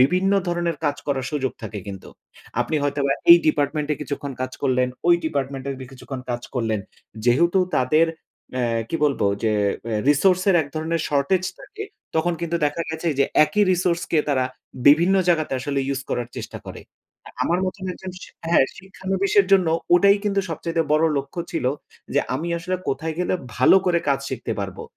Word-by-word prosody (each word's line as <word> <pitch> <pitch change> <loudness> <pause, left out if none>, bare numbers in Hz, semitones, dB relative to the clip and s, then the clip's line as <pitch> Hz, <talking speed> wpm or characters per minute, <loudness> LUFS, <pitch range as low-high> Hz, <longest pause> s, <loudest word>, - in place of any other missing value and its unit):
বিভিন্ন 180 +9 +3 0.2
ধরনের 170 -1 -1
কাজ 145 -1 +1
করার 135 -3 -1
সুযোগ 135 -3 -1
থাকে 110 -1 -5
কিন্তু। 95 -2 -8 0.5
আপনি 120 +6 0
হয়তো 145 0 -1
বা 135 - +3 0.2
এই 170 - +12
ডিপার্টমেন্টে 150 0 +1
কিছুক্ষণ 140 -1 -4
কাজ 130 0 -3
করলেন, 130 -2 +2 0.2
ওই 175 - +8
ডিপার্টমেন্টে 140 -2 -2 0.2
কিছুক্ষণ 135 0 -7
কাজ 120 0 -3
করলেন। 110 -4 0 0.4
যেহেতু 170 +10 +4 0.2
তাদের 155 +6 +3 0.5
অ্যা 125 -1 0 0.2
কি - - -1
বলবো, 140 -8 +1 0.2
যে 110 -1 +2 0.3
অ্যা 115 -2 -1
রিসোর্সের 185 +6 +4
এক - - -8
ধরনের 160 +1 -1
শর্টেজ 150 +6 +1 0.2
থাকে, 420 +1 -8 0.3
তখন 165 +2 +2
কিন্তু 170 0 -1
দেখা 145 +3 -2
গেছে 160 +1 -2
যে 140 - +5 0.2
একই 155 +8 +1
রিসোর্সকে 175 -2 0
তারা 130 -3 +2 0.4
বিভিন্ন 165 +6 +6
জায়গাতে 160 -4 +2
আসলে 140 +1 -2
ইউজ 135 -1 -1
করার 120 -1 -2
চেষ্টা - - -6
করে। - - -8 0.5
আর - - -11
আমার 175 - +1
মতন 185 +1 -5
একজন 190 +1 -8
শি - - -10 0.2
হ্যাঁ, 170 -5 +5
শিক্ষানবিশের 195 +1 0
জন্য 185 -4 +5 0.3
ওটাই 200 +3 +6
কিন্তু 200 -1 +1
সবচাইতে 165 +1 -1
বড় 155 +1 +4
লক্ষ্য 140 +5 -3
ছিল, 165 - -2 0.5
যে - - +4
আমি 170 - -3
আসলে 185 +2 -2
কোথায় 160 +4 -2
গেলে 180 +1 0 0.2
ভালো 130 +8 +6
করে 175 -1 +3
কাজ 140 -1 +2
শিখতে 125 -3 -4
পারবো, 95 -1 -5
155 Hz, 170 wpm, -23 LUFS, 135-175 Hz, 0.5 s, এই